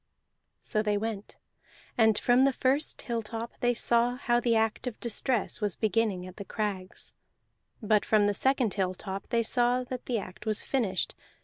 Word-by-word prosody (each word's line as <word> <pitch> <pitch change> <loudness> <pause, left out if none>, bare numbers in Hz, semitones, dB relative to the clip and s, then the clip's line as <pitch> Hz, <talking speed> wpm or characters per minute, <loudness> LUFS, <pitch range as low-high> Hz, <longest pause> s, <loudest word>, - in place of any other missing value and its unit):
So 215 - -1
they 210 -1 +1
went, 215 -1 -5 0.6
and 220 -2 +4
from 245 +3 +4
the 275 0 +4
first 270 +5 0
hilltop 230 0 -4
they 245 0 +2
saw 235 +1 +3
how 240 -2 +1
the 235 -1 +2
act 225 +3 0
of 240 - -5
distress 235 0 0
was 205 -3 0
beginning 215 -3 0
at 185 0 -11
the 200 - -5
crags; 195 -2 -3 0.7
but 210 0 +3
from 215 -2 +3
the 205 - +2
second 260 -1 +1
hilltop 190 0 -3
they 235 -1 +1
saw 245 +2 +2
that 250 0 -7
the 245 - 0
act 195 +1 -8
was 215 -1 0
finished. 210 -9 0
225 Hz, 170 wpm, -29 LUFS, 205-245 Hz, 0.7 s, and